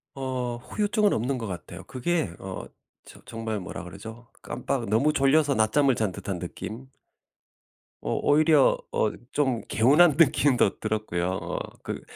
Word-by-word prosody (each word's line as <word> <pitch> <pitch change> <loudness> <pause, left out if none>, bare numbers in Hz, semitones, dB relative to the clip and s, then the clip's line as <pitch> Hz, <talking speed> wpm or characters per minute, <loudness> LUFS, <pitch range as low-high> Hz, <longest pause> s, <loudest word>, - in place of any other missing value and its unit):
어 130 -3 -3
후유증은 205 - 0
없는 125 +4 -1
것 115 - -4
같아요. 90 -6 -7
그게 155 - -1
어 95 -1 -7 0.4
저 - - -14
정말 110 -2 -4
뭐라 90 - -7
그러죠? 110 +6 -10
깜빡 - - -3
너무 120 +9 +3
졸려서 140 0 +3
낮잠을 125 +5 +3
잔 105 -5 -1
듯한 100 -2 -5
느낌? 110 +8 -7 1.1
어 - - -2
오히려 150 -1 +4
어 110 - +1 0.2
좀 130 -6 +1
개운한 145 +7 +5
느낌도 140 - +3
들었고요. 105 -5 -2
어 - - -4 0.2
그 - - -5
120 Hz, 270 characters per minute, -26 LUFS, 110-145 Hz, 1.1 s, 개운한